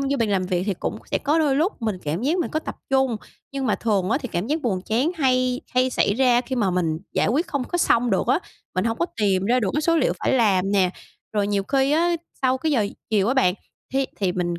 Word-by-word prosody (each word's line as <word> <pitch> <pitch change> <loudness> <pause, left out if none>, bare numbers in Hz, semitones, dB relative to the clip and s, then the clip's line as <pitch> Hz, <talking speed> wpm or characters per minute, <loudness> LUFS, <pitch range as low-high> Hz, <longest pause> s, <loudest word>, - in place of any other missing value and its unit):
vô 275 0 0
bàn 230 - +1
làm 190 -2 +1
việc 180 -1 0
thì 200 - 0
cũng 215 - -4
sẽ - - +1
có 300 +4 +1
đôi 290 -4 +2
lúc 330 - 0
mình 215 -4 -1
cảm 155 +7 -2
giác 310 +8 +1
mình 345 - -1
có 310 - 0
tập - - -7
trung, 265 -3 +2 0.4
nhưng 275 -1 -2
mà 215 - +2
thường 205 -4 0
á, 265 - +2
thì 250 - -6
cảm 175 +3 -1
giác 305 +5 -1
buồn 195 -7 0
chán 245 - 0
hay 255 -2 +2
hay 255 +1 +3
xảy 200 - +1
ra 245 0 +4
khi 255 +1 -4
mà 205 -5 +1
mình 165 -3 0
giải - - +1
quyết 290 - +1
không 280 -5 -2
có 350 - -3
xong 240 -7 +3
được 190 - +1
á, - - +3 0.4
mình 185 - 0
hổng 230 0 -1
có 340 - +1
tìm 195 -2 +2
ra 245 +4 +2
được 200 -5 -1
mấy 300 - +1
số 330 +2 +2
liệu 300 - +2
phải - - 0
làm 200 -6 +2
nè. 190 -3 +3 0.4
Rồi 205 -1 +1
nhiều 200 -1 0
khi 270 +4 +1
á, 340 +2 +2 0.3
sau 260 0 +2
cái 310 +3 0
giờ 225 -7 +2 0.2
chiều 205 -1 +2
á 255 - +2
bạn, 185 -10 +3 0.4
thi 270 0 +1
thì 190 -3 0
mình 175 -1 -2
240 Hz, 265 wpm, -23 LUFS, 195-270 Hz, 0.4 s, ra